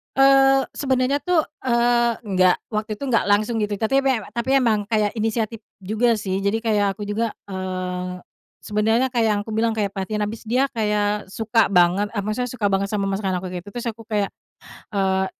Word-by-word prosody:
Eee, 270 0 +6 0.2
sebenarnya 260 0 +1
tuh, 360 -3 +3 0.2
eee, 240 -1 +3
nggak, 185 -4 +3
waktu 215 0 -3
itu 210 - -8
nggak 230 - +2
langsung 210 +3 +2
gitu, 210 -1 -1
tapi 225 +5 +2
mewe 270 -4 +2
tapi 235 +3 -1
emang 215 -4 +1
kayak 210 -1 +1
inisiatif 225 +1 -1 0.2
juga 220 +5 +1
sih. 195 -3 -2
Jadi 200 +3 0
kayak 205 -3 +1
aku 210 - -12
juga, 210 +2 -2 0.2
eee, 185 -1 -4 0.4
sebenarnya 220 +5 +1
kayak 240 -2 +1
yang 205 - 0
aku 210 - -10
bilang 225 0 +2
kayak 210 -2 -1
perhatian, 200 +2 -3
habis 215 +2 -4
dia 255 +5 +1
kayak 210 -3 0
suka 225 +1 +2
banget 185 +3 +2
eee, 205 - -1
maksudnya 215 +5 -2
suka 210 -5 0
banget 195 0 0
sama 200 -1 0
masakan 195 -2 -1
aku 190 - -5
gitu. 175 - -9
Terus 240 0 -4
aku 225 0 -10
kayak, 210 -3 -1 0.6
eee, 190 -2 +1
215 Hz, 185 wpm, -22 LUFS, 200-235 Hz, 0.6 s, Eee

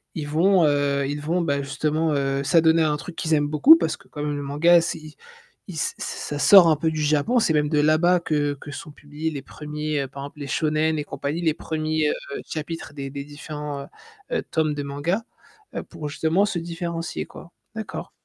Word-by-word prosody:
ils 150 -2 -4
vont, 170 +3 +4
heu, 140 -1 +1
ils 145 +1 -3
vont, 170 +4 0
bah, 140 -4 0
justement, 155 +3 -1
heu, 135 0 0
s'adonner 165 +1 +4
à 155 - +3
un 150 - 0
truc 165 +3 -9
qu'ils 160 0 -1
aiment 145 0 +1
beaucoup 155 - +7
parce - - -1
que 195 - -21
quand 150 -5 -6
même 150 -1 -1
le 145 - -4
manga 165 +5 +4
c'est 165 - -3
il 155 -1 -12 0.6
il 180 - -7
ç 155 - -1
ça 145 - -4
sort 185 +1 +8
un 155 - +5
peu 160 +2 0
du 155 -1 -2
Japon. 150 - +2
C'est 165 -8 +2
même 150 -1 +2
de 150 -2 +2
là-bas 160 +4 +4
que 145 -3 0
que 145 - -9
sont 150 +2 -8
publiés 150 +2 -5
les 145 -3 -5
1ers 150 -1 -4
par 140 +1 -8
exemple 145 +1 -10
les 145 - -5
shonen 155 +1 +1
et 150 - -2
compagnie, 145 +3 -4
les 160 -3 +2
1ers, 155 -1 -1
heu, 140 - -5
chapitres 160 -1 -6
des 135 -1 -5
des 140 0 -5
différents, 150 0 -6
heu - - -12 0.5
heu, - - -1
tomes 155 -2 0
de 145 - -3
mangas, 145 +9 -1 0.5
heu, - - -3
pour 150 - -7
justement 160 +6 +1
se 185 -4 -2
différencier, 170 0 -4
quoi. 170 - -13 0.2
D'accord. 220 -3 -6
155 Hz, 215 wpm, -24 LUFS, 145-165 Hz, 0.6 s, sort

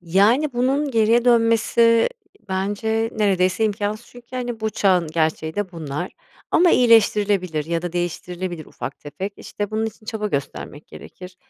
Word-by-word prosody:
Yani, 205 - +3
bunun 270 +4 0
geriye 230 0 +3
dönmesi 230 -1 +4 0.4
bence 215 +4 -1
neredeyse 190 -1 +1
imkânsız 210 +2 -2
çünkü, 245 -1 -15
hani, 240 -3 -4
bu 220 - -1
çağın 185 -6 +2
gerçeği 160 0 -1
de 205 -3 -3
bunlar. 160 +1 -5 0.4
Ama 350 +1 +5
iyileştirilebilir 205 - +3
ya 165 +1 -2
da 175 -1 -4
değiştirilebilir 175 -1 -4
ufak 130 +3 -7
tefek. 190 +8 -6
İşte, 205 -1 -5
bunun 220 +1 -1
için 215 0 -10
çaba 215 -2 -3
göstermek 145 -1 -5
gerekir. 180 0 -12
205 Hz, 140 wpm, -22 LUFS, 175-230 Hz, 0.4 s, Ama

